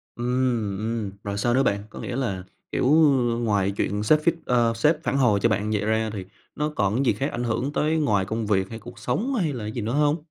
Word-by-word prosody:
Ừm, 120 -5 0
ừm, 110 -2 -2
rồi 100 0 -3
sao 120 +3 +1
nữa 135 - +4
bạn? 100 -4 0
Có - - -9
nghĩa 125 - -4
là, 95 -9 -2 0.3
kiểu, - - 0 0.6
ngoài 100 -3 +1
chuyện 105 +1 -1
sếp 150 +8 +4
feed 165 +1 +3
ờ, 120 -2 +3
sếp 150 +7 +2
phản 135 - -1
hồi 115 -7 +3
cho 115 - +4
bạn 105 0 0
vậy 105 -1 0
ra 110 0 0
thì, 95 -3 -5 0.3
nó 150 0 -1
còn 110 +7 +1
gì 115 - +5
khác 135 +8 -2
ảnh 120 +1 -3
hưởng 125 +5 -1
tới 155 +2 +1
ngoài 105 -10 +2
công 110 +2 -3
việc 95 -2 +1
hay 115 - -6
cuộc 120 +1 -12
sống, 200 - -1
hay 170 - 0
là 115 -5 -5
gì 115 +2 -4
nữa 110 +3 -2
hông? 150 +1 +2
115 Hz, 240 wpm, -24 LUFS, 105-130 Hz, 0.6 s, gì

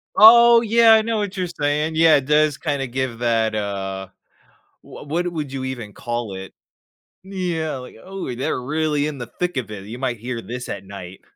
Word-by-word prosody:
Oh, 235 +2 +8
yeah, 230 0 +5
I 220 - +6
know 225 0 -1
what 205 -2 -3
you're 185 -1 -2
saying. 150 0 -1
Yeah, 160 -2 +6
it 135 - -3
does 150 0 +3
kinda 145 -4 -2
give 125 -2 -3
that, 115 -2 +1
uh, 95 -2 -4 0.7
wha - - -12
what 170 +5 -1
would 150 -4 -4
you 135 -1 -4
even 120 -6 -6
call 120 -4 -4
it? 95 0 -8 0.7
Yeah, 175 -6 -3
like, 125 -1 -10
oh, 190 -9 -6
they're 125 +1 -2
really 150 +1 0
in 145 -3 -4
the 120 - -6
thick 175 +5 -3
of 125 - -3
it, 100 -2 -8
you 120 +4 -8
might 125 -3 -2
hear 120 +1 -5
this 125 +2 -7
at 100 -1 -5
night. 95 -2 -10
135 Hz, 195 wpm, -21 LUFS, 115-165 Hz, 0.7 s, Oh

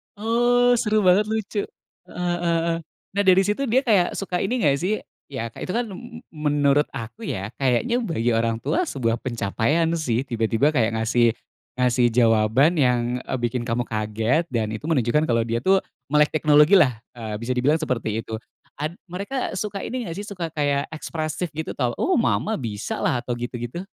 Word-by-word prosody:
Oh 240 +3 +3
seru 215 -2 +2
banget 185 +3 +5
lucu. 215 -1 -2 0.5
Heeh 175 -1 -2
heeh 170 -1 +1
heeh, 170 0 0 0.3
nah 200 +1 0
dari 185 0 +7
situ 210 +7 -1
dia 255 +4 +3
kayak 200 -8 +2
suka 185 -2 -2
ini 240 +3 -1
nggak 140 -2 +3
sih, 185 +5 0 0.3
ya 115 -5 -5
kayak - - -7
itu 185 - -3
kan 240 0 +1
m 235 +5 -10
menurut 145 -1 +2
aku 120 - -7
ya, 100 +3 -4
kayaknya 135 - +1
bagi 120 - -1
orang 115 0 +1
tua 360 0 0
sebuah 115 - -1
pencapaian 120 +8 0
sih 125 -4 0
tiba-tiba 115 +2 +1
kayak 115 -6 +1
ngasih 115 +1 +2 0.4
ngasih 125 -1 +3
jawaban 115 +5 +3
yang, 125 -2 +1
eee, 130 - -3
bikin 120 0 -1
kamu 120 +1 0
kaget 110 +9 0
dan 110 -3 -1
itu 110 +9 -6
menunjukkan 150 +1 +2
kalau 115 -1 +2
dia 115 0 -1
tuh 190 +7 +4 0.3
melek 150 0 +3
teknologilah, 150 - +5
eee, 110 -3 -6
bisa 115 +2 -2
dibilang 130 +5 +2
seperti 115 -7 -2
itu. 110 -1 -5 0.4
Ad 150 +3 -3 0.2
mereka 200 +9 -3
suka 200 0 -3
ini 250 -1 -4
nggak 165 -2 -5
sih? 205 - -5
Suka 185 -5 -4
kayak 145 -2 0
ekspresif 155 +2 -4
gitu 160 +1 -5
atau, 125 -3 0
“Oh 375 - +2
Mama 220 -2 +1
bisalah,” 115 +1 -2
atau 120 0 -3
gitu 120 +1 -5
gitu? 120 +9 -5
145 Hz, 180 wpm, -23 LUFS, 120-185 Hz, 0.5 s, dari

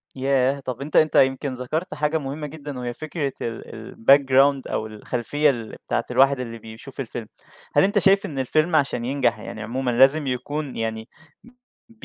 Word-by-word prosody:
ياه! 135 +1 +1
طَب 130 0 -6
أنت 150 +2 -6
أنت 155 - +4
يمكن 135 +1 +3
ذَكرت 155 +8 -3
حاجة 150 +1 0
مهمة 150 +1 -5
جدًا 145 -3 -8
وهي 120 -1 -4
فكرة 155 -1 -4
ال 115 -1 -7
الbackground 135 +2 +5
أو 110 - -1
الخلفية 125 +7 0
الل 115 -4 -3
بتاعة - - 0
الواحد 135 0 +4
اللي 115 -2 -5
بيشوف 115 +5 -11
الفيلم. 120 -3 -5 0.5
هل - - +6
أنت 200 - +3
شايف 195 0 +4
إن 140 -3 -5
الفيلم 155 +6 +1
عشان 140 -5 +1
ينجح 135 +1 +1
يعني 110 - -8
عمومًا 125 +3 -2
لازم 135 +5 +4
يكون 135 +3 -3
يعني 110 0 -4 0.8
ب 230 -1 -22
135 Hz, 170 wpm, -23 LUFS, 120-150 Hz, 0.8 s, هل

